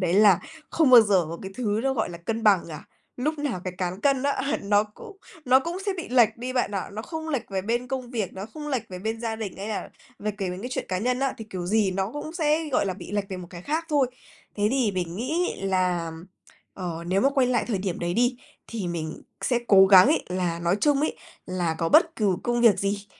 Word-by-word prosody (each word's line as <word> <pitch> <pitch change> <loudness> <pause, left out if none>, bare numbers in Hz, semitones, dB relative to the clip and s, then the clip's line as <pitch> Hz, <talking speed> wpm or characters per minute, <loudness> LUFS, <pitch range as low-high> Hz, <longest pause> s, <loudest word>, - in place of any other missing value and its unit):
đấy 180 -1 +1
là 200 -3 +6 0.3
không 310 -5 +3
bao 245 - +11
giờ 195 -5 +3
có 170 +1 -6
cái 190 0 -7
thứ 220 -3 0
nó 270 - +1
gọi 220 -6 -1
là 170 - -8
cân 225 +6 -3
bằng 205 -5 +4
cả. 155 -2 -8 0.3
Lúc 300 +5 -1
nào 285 -10 -2
cái 185 - -3
cán 185 +1 -3
cân 275 0 +2
á 280 0 0
nó 205 +1 +3
cũng 390 - -13 0.3
nó 260 +1 +5
cũng 335 +5 -4
sẽ 400 - +1
bị 345 - -6
lệch 235 -3 +4
đi 250 +2 -5
bạn 250 -5 0
ạ. 195 - -3
Nó 215 +2 -5
không 320 +4 -6
lệch 275 -9 -3
về 190 -1 -2
bên 240 +4 -1
công 255 -2 -4
việc, 220 -7 -2
nó 190 +2 -6
không 300 -1 -6
lệch 260 -6 -1
về 185 - -7
bên 220 +4 -3
gia 225 -1 -2
đình 215 -4 -5
hay 200 +2 -6
là 215 - -4 0.3
về 210 - -2
kể 190 -3 -2
về 180 - -5
cái 245 - -4
chuyện - - -2
cá 185 - -1
nhân 250 +5 0
á, 270 -1 0
thì 225 - -6
kiểu 180 -2 -4
gì 210 0 +2
nó 190 +2 -2
cũng 295 +2 -6
sẽ, 315 -1 +1
gọi 225 - +2
là, 185 - -2
bị 200 - -10
lệch 205 -1 -1
về 190 - -5
một 180 -1 -8
cái 175 -1 -9
khác 315 - -1
thôi. 290 -4 +3 0.5
Thế 205 0 +2
thì 255 -4 +2
mình 175 -2 -3
nghĩ 315 - -1
là, 185 -3 +1
ừm, 160 +1 -9 0.5
ờ, 170 -3 -5
nếu 185 +2 +2
mà 270 - +4
quay 270 -2 +2
lại 245 -2 +1
thời 210 -5 0
điểm 185 -2 -3
đấy 175 0 -2
đi, 245 +2 +2 0.3
thì 220 -5 -4
mình 160 -2 -5 0.2
sẽ 245 -3 +1
cố 195 -1 +8
gắng 190 0 +8
ấy 305 +4 +2
là, 180 -2 -1
nói 170 +2 +1
chung 290 -2 +3
ấy, 305 - -1 0.3
là 180 -3 -1
có 165 - 0
bất 330 - +4
cừ 200 -4 +1
công 240 0 0
việc 230 -4 +5
gì 200 +1 -2
215 Hz, 260 wpm, -25 LUFS, 185-260 Hz, 0.5 s, bao